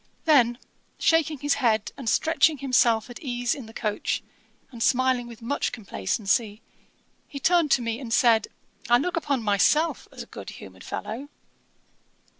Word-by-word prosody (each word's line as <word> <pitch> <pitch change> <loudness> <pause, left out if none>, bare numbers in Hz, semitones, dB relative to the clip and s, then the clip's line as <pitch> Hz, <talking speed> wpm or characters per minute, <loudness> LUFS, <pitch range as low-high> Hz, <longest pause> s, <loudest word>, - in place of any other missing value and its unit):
Then, 245 -7 +4 0.4
shaking 320 -2 +2
his 290 +1 0
head 220 -4 +1
and 260 -5 -3
stretching 320 +1 +3
himself 245 -4 +2
at 245 - -9
ease 245 -4 -1
in 260 -6 -8
the - - -11
coach, 210 -2 -2 0.5
and 235 -3 -10
smiling 255 -1 +2
with 235 -1 -12
much 285 +5 -1
complacency, 210 - -2 0.6
he 280 - -7
turned 340 +1 +3
to 255 - +3
me 230 0 -3
and 245 -4 -7
said, 225 -2 +4 0.4
'I 240 - +6
look 350 +7 -2
upon 280 -7 -1
myself 220 +11 +2
as - - -8
a - - -14
good - - -10
humoured - - -12
fellow.' 250 +7 -6
245 Hz, 155 wpm, -25 LUFS, 225-285 Hz, 0.6 s, I